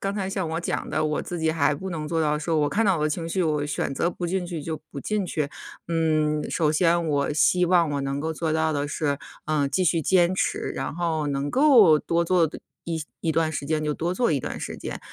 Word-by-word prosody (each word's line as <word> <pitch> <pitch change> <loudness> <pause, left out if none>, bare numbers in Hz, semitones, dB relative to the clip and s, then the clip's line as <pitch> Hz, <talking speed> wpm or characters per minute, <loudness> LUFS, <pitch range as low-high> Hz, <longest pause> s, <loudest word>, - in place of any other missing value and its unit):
刚 195 +1 -2
才 195 -2 -2
像 190 -4 -2
我 165 +1 -2
讲 175 - -3
的， 155 - 0
我 150 0 0
自 175 - -5
己 160 -1 +1
还 145 -2 +2
不 190 +6 -6
能 155 -3 -4
做 165 0 -1
到 150 -1 +1
说 160 +1 -1
我 145 - +2
看 225 +2 +1
到 190 -3 +3
我 150 - -2
的 155 - +1
情 165 +2 -3
绪， 185 +2 0
我 150 -2 0
选 145 - -2
择 170 - 0
不 175 - -4
进 180 0 -1
去 165 -4 -5
就 160 0 -4
不 140 - -7
进 210 +6 -2
去。 150 -4 -2 0.4
嗯， 155 -2 +1
首 155 -3 +1
先 170 +1 +2
我 145 -1 0
希 180 +3 +3
望 170 -3 +3
我 145 - -1
能 140 0 -2
够 160 +2 -2
做 160 0 -2
到 160 0 +1
的 145 0 -1
是， 145 -1 -1 0.3
呃， 150 -2 +1
继 185 +5 0
续 165 0 +2
坚 180 +2 +3
持， - - -1
然 - - -4
后 165 -3 -1
能 140 0 -2
够 235 - +6
多 170 +2 0
做 175 -1 +3
的 - - -8 0.3
一 165 -2 -3 0.2
一 165 - 0
段 160 0 +1
时 140 -1 -4
间 155 0 0
就 150 - 0
多 175 +4 -2
做 240 0 +1
一 140 - +1
段 - - -5
时 - - -5
间。 - - -5
160 Hz, 275 characters per minute, -25 LUFS, 150-175 Hz, 0.4 s, 够